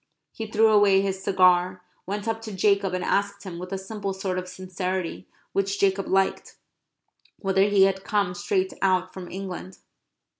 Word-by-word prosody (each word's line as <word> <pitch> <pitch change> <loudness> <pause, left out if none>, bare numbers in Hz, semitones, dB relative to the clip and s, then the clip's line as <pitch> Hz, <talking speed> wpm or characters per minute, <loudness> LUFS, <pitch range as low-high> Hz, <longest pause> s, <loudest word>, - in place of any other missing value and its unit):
He 225 - -6
threw 220 +1 +4
away 205 -2 +5
his 190 -1 -3
cigar, 185 -1 +3 0.2
went 205 +2 -4
up 225 0 -1
to 225 -1 -7
Jacob 200 -1 +2
and 180 - -2
asked 200 +1 0
him, 180 -4 -7
with 180 +1 -7
a 195 - -1
simple 195 0 -5
sort 190 -1 -2
of 185 - -7
sincerity 185 -1 -4 0.3
which 195 0 0
Jacob 195 0 +1
liked, 195 0 0 0.8
whether 195 -1 +2
he 200 -1 +4
had 190 0 +2
come 200 -4 0
straight 190 0 -1
out 185 -1 +1
from 185 -2 -8
England. 185 -1 -7
195 Hz, 165 wpm, -25 LUFS, 185-200 Hz, 0.8 s, away